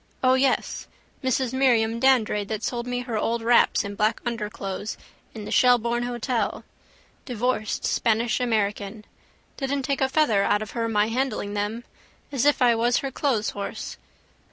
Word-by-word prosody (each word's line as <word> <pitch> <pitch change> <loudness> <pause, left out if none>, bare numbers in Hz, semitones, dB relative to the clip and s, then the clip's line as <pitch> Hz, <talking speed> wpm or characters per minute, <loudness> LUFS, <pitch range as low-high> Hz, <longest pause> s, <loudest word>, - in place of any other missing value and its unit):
O 255 0 +5
yes! 260 0 0 0.4
Mrs 260 -1 0
Miriam 230 -4 +2
Dandrade 230 -6 +2
that 215 -1 -4
sold 240 -1 -3
me 245 0 -2
her 240 -3 -3
old 230 +1 -1
wraps 235 +1 +4
and 200 0 -6
black 215 +2 +1
underclothes 210 -3 -4 0.4
in 215 -2 -7
the - - -7
Shelbourne 240 -1 +3
hotel. 240 -2 -2 0.6
Divorced 245 -3 -1
Spanish 230 0 +1
American. 210 -3 -1 0.5
Didn't 275 0 -2
take 275 +1 -1
a 265 - +2
feather 265 -8 +3
out 205 +1 +2
of 215 - -9
her 230 -1 -2
my 210 0 +2
handling 230 -4 -2
them. 210 +3 -2 0.5
As 275 -2 0
if 290 -3 +4
I 240 -1 +5
was 235 +1 +2
her 275 - -4
clotheshorse. 220 -8 -2
235 Hz, 155 wpm, -25 LUFS, 215-255 Hz, 0.6 s, O